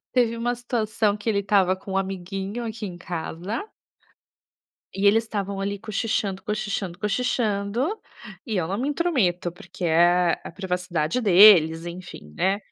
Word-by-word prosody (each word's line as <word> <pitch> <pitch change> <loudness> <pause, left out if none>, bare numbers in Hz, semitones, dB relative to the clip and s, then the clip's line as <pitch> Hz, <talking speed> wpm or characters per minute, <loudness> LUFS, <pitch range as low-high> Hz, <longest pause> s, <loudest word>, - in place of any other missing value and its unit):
Teve 240 -2 +2
uma 240 +1 -1
situação 220 -3 -1
que 210 +2 -6
ele 200 -2 +2
estava 195 -2 +2
com 190 0 -9
um - - 0
amiguinho 195 +4 -4
aqui 220 -1 -5
em 180 -2 -7
casa 175 - -5 1.3
E 195 +1 +1
eles 225 +3 +5
estavam 200 -3 -4
ali 200 0 -2
cochichando, 210 -2 -2
cochichando, 200 -4 -3
cochichando, 225 - -1 0.5
e 220 -3 -2
eu 180 - 0
não 195 +5 -3
me 265 - -1
intrometo, 250 - 0
porque 180 +1 -9
é 175 +1 +3
a - - -8
privacidade 180 0 -2
deles, 175 -5 +7
enfim, 170 - -9
né. 195 +2 +1
200 Hz, 145 wpm, -24 LUFS, 180-220 Hz, 1.3 s, deles